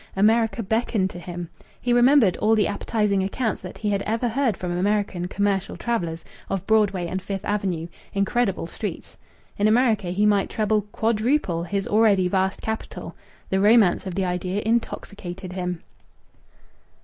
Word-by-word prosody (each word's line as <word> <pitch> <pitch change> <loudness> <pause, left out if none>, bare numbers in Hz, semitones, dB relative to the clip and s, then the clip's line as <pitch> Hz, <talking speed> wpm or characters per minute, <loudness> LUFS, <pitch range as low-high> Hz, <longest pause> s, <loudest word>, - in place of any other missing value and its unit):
America 225 +3 +2
beckoned 215 -2 0
to 175 - -8
him. 175 0 -6 0.3
He 245 - 0
remembered 245 -6 +5
all 220 +1 +3
the 210 - +3
appetizing 205 -1 0
accounts 210 +3 -2
that 180 - -8
he 210 -1 -1
had 200 -1 0
ever 230 +4 -1
heard 245 -1 0
from 175 -1 -3
American 195 -1 0
commercial 195 0 -1
travellers 170 -9 -2 0.2
of 195 -1 -2
Broadway 205 -4 +2
and 185 +2 -3
Fifth 195 0 -5
Avenue 190 -5 -1 0.2
incredible 200 -1 0
streets. - - -6 0.4
In 205 - +4
America 220 -4 +3
he 190 +4 +1
might 205 -2 +3
treble, 215 -1 0
quadruple, 220 - 0
his 195 +1 -2
already 205 -4 +4
vast 190 +1 0
capital. 220 0 -5 0.4
The 190 - +2
romance 205 -2 +4
of 180 - -4
the 190 -1 0
idea 180 +3 -2
intoxicated 195 -5 -3
him. 180 -2 -4
200 Hz, 150 wpm, -24 LUFS, 185-220 Hz, 0.4 s, remembered